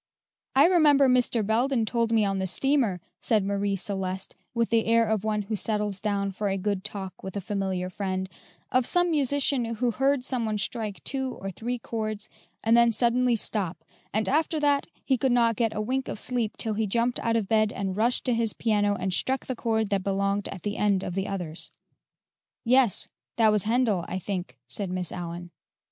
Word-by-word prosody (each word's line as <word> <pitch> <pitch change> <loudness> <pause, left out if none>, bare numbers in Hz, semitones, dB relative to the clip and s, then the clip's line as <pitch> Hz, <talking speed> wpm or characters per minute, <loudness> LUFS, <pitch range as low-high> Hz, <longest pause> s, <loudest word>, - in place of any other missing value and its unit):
"I 275 - +7
remember 300 -6 +5
Mr. 250 -3 +2
Belden 235 +2 +1
told 230 0 0
me 220 -2 +3
on 195 -1 0
the 190 - -1
steamer," 240 -1 +1 0.2
said 215 -3 +2
Marie 200 0 0
Celeste, 190 0 -4 0.2
with 230 -1 0
the 225 -1 +3
air 230 0 +4
of 215 -2 0
one 210 -1 0
who 215 +2 -3
settles 210 -2 0
down 200 -1 -1
for 200 +2 -2
a 195 - 0
good 195 0 -2
talk 195 -3 -5
with 190 +1 -6
a - - 0
familiar 190 -2 -2
friend, 190 0 -3 0.4
"of 255 -1 +2
some 355 -1 +2
musician 285 -3 +2
who 240 +2 +1
heard 270 +2 +1
some 255 -3 0
one 215 -1 -1
strike 210 -1 -3
two 265 -1 -2
or 195 0 -6
three 240 +6 -3
chords 215 -2 -4 0.3
and 225 +1 +4
then 235 0 +5
suddenly 240 +2 +2
stop, 200 -5 -2 0.3
and 215 -1 0
after 310 - +1
that 285 -1 +2 0.2
he; 265 -3 +2
could 265 +1 +2
not 235 -2 +3
get 225 0 0
a 210 - -1
wink 260 +4 -1
of - - -4
sleep 235 -2 -1
till 220 -2 -1
he 215 0 0
jumped 235 +4 +1
out 230 0 0
of 220 -4 0
bed 215 0 +3
and 195 -1 -3
rushed 235 +4 +1
to 250 - +2
his 230 -2 +1
piano 205 -2 +1
and 185 -1 -2
struck 265 +7 +1
the 255 - -3
chord 220 -3 -1
that 200 -1 +1
belonged 200 +1 0
at 185 - -8
the 205 0 -3
end 200 -2 +2
of 180 - -4
the 195 +1 -2
others." 170 -4 -4 1.0
"Yes; 245 -3 +3 0.3
that 220 -2 +4
was 210 -2 +2
Handel, 220 -5 +2
I 185 - -3
think," 190 -1 -5
said 200 -3 -2
Miss 180 -2 -3
Allyn. 175 0 -6
215 Hz, 200 wpm, -27 LUFS, 195-245 Hz, 1.0 s, I